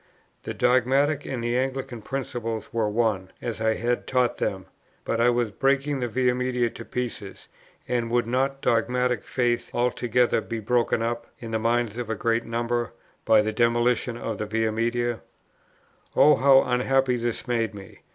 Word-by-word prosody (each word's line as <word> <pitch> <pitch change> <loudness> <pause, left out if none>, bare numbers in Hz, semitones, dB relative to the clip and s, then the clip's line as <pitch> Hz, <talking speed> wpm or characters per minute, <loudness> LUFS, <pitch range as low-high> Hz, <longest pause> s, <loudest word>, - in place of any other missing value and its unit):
The - - -6
dogmatic 135 +4 +2
and 125 -3 -3
the 120 +1 0
Anglican 130 -2 -2
principle 115 -2 -4
were 110 -2 0
one, 105 -4 0
as 115 -2 -5
I 110 0 +2
had 120 +1 -1
taught 125 -2 +1
them; 95 -1 -2 0.4
but 115 - 0
I 120 - +5
was 120 -2 0
breaking 140 +3 +1
the 125 - -1
Via 125 +2 +1
Media 125 -2 0
to 115 - -9
pieces, 115 -5 -5 0.4
and 120 -2 -1
would 120 0 +1
not 135 +3 -1
dogmatic 125 -1 +1
faith 120 -2 -1
altogether 120 0 +1
be 115 -1 -5
broken 115 +1 +1
up, 120 0 -3
in 115 -1 -7
the 110 - 0
minds 115 0 0
of 120 -2 -4
a 110 - -1
great 115 +2 0
number, 120 0 -2 0.3
by 110 -1 +6
the 110 0 -2
demolition 120 +1 +1
of 115 -2 -4
the 105 - -3
Via 110 0 0
Media? 120 +1 -1 1.0
Oh! 150 - +7
how 135 0 +6
unhappy 125 +1 +1
this 120 0 -3
made 115 -3 0
me! 95 -3 -12
120 Hz, 170 wpm, -25 LUFS, 115-125 Hz, 1.0 s, Oh